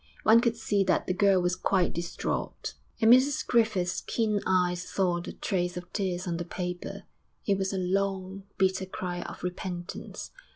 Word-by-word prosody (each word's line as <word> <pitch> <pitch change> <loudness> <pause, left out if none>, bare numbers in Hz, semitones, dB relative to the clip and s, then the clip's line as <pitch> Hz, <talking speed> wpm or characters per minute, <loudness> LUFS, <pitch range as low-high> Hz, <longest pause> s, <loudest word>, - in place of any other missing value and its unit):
One 225 +2 +7
could 235 -2 +1
see 205 -3 +1
that - - +2
the 180 - 0
girl 195 0 +4
was 180 0 +1
quite 185 -1 +1
distraught, 170 0 -3 0.3
and 225 0 +7
Mrs 265 +3 +4
Griffith's 215 -7 +2
keen 215 -3 0
eyes 180 -1 +2
saw 180 -2 0
the - - -6
trace 180 -2 -1
of 180 0 -8
tears 185 -2 -1
on 170 -1 -1
the 175 - -2
paper.... 180 0 -5 0.4
It 200 -2 +2
was 190 0 0
a 195 - -2
long, 190 +1 -1 0.2
bitter 190 0 +1
cry 180 -1 -4
of - - -8
repentance. 180 -1 -5
185 Hz, 170 wpm, -28 LUFS, 180-200 Hz, 0.4 s, One